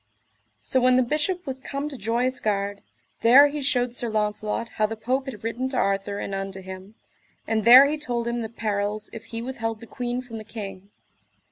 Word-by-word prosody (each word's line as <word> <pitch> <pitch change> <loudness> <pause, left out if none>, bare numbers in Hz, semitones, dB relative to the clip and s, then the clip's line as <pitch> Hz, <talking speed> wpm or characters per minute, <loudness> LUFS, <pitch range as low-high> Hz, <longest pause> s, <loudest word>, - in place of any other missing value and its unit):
So 260 - +1
when 250 0 +5
the 255 - +4
Bishop 310 +8 -1
was 265 -2 -4
come 275 +2 -4
to 285 - -6
Joyous 240 +3 0
Gard, 200 -1 -1 0.4
there 270 +5 +7
he 295 0 -4
shewed 250 -3 +1
Sir 240 -1 -2
Launcelot 215 +1 -1
how 215 - +3
the 225 - -5
Pope 255 +5 -1
had 215 -6 -7
written 240 +3 -2
to 260 - -2
Arthur 200 0 0
and 200 - -4
unto 195 0 -4
him, 190 +2 -10 0.5
and 220 -1 0
there 250 +4 +10
he 300 +2 -1
told 240 -5 -2
him 235 0 -1
the 220 - -4
perils 210 -1 -2
if 225 - -8
he 230 0 -6
withheld 225 -3 -4
the 230 - -10
queen 245 +1 -3
from 230 -3 -8
the - - -8
king. 200 -3 -8
230 Hz, 205 wpm, -25 LUFS, 210-255 Hz, 0.5 s, there